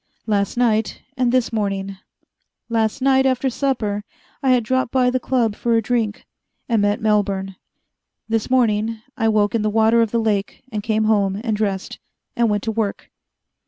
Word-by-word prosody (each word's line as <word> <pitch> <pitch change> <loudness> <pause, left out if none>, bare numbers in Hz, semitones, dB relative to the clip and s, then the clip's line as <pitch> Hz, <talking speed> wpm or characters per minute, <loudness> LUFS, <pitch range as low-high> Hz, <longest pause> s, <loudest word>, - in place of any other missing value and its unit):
Last 205 0 0
night 225 -3 +1 0.2
and 250 -2 +1
this 250 -2 +1
morning. 195 -2 -2 0.7
Last 225 +3 0
night, 265 0 +4
after 260 0 0
supper, 225 -7 -1 0.4
I 270 - +1
had 250 -2 +4
dropped 260 +2 0
by 250 -1 +3
the 255 - 0
Club 235 -4 0
for 235 +1 0
a - - +2
drink. 225 -2 -1 0.4
And 230 -4 +2
met 205 +1 +1
Melbourne. 200 -3 0 0.7
This 225 +1 -1
morning 225 -3 +1 0.2
I 225 - 0
woke 210 -1 +2
in 230 - +1
the 215 - +1
water 225 +2 +3
of 225 - +1
the 235 - -1
lake, 210 -3 -1
and 210 -1 -3
came 220 +1 0
home, 200 -2 +1
and 225 -3 0
dressed. 200 -3 -3 0.4
And 235 -1 +2
went 205 -1 0
to 225 - -1
work. 215 -2 -3
220 Hz, 175 wpm, -21 LUFS, 205-240 Hz, 0.7 s, night